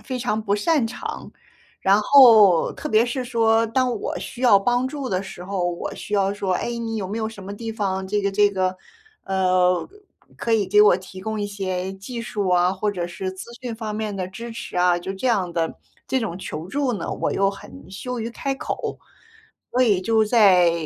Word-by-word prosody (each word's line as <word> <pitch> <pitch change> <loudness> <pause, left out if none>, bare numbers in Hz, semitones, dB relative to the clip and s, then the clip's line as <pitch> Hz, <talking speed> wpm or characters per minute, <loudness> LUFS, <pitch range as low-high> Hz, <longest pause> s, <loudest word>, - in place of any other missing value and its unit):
非 255 -2 -4
常 220 -3 -1
不 200 -1 0
擅 255 +3 +1
长。 225 - -7 0.5
然 195 +2 +4
后， 215 - +7
特 - - -6
别 220 +2 +3
是 250 +1 -3
说 225 -1 +2
当 250 +1 +1
我 210 - -4
需 250 - -8
要 205 -6 +7
帮 245 +5 +1
助 280 -2 -5
的 185 0 -1
时 185 -2 -9
候， 180 -2 -1
我 170 - -5
需 210 - -5
要 200 0 +1
说： 195 -2 -2
“哎， - - -2
你 225 -1 -3
有 195 -3 -3
没 205 +4 -5
有 220 -1 -2
什 210 -3 -11
么 200 +1 -6
地 225 +1 -6
方 190 -3 -2
这 205 +1 0
个 200 - 0
这 205 0 +4
个 185 -1 -1 0.5
嗯， 185 -2 +1 0.5
可 230 - -2
以 210 -4 +2
给 210 +2 +5
我 205 -4 +6
提 185 0 -11
供 220 +1 -3
一 205 - -1
些 190 -2 -3
技 230 +5 -7
术 205 -4 -3
啊， 180 +1 +3
或 205 +2 -1
者 175 -3 -3
是 185 +2 -5
资 190 0 -9 0.2
讯 245 -2 -4
方 220 -2 -5
面 215 -1 -3
的 185 -1 -3
支 230 +6 -8
持 225 -5 -7
啊？” 180 0 +3
就 190 +2 -5
这 250 +7 -1
样 185 -7 0
的 165 -1 -2 0.3
这 265 - +1
种 210 -7 -3
求 165 -3 -6
助 275 +3 -1
呢， 205 - -4
我 - - -2
又 195 0 +2
很 95 - -10
羞 250 +6 -5
于 225 +1 -3
开 275 +3 -3
口。 - - -4 0.7
所 250 - 0
以 210 -7 +4
就 220 +3 +2
在 195 -6 +5
205 Hz, 230 characters per minute, -22 LUFS, 185-230 Hz, 0.7 s, 后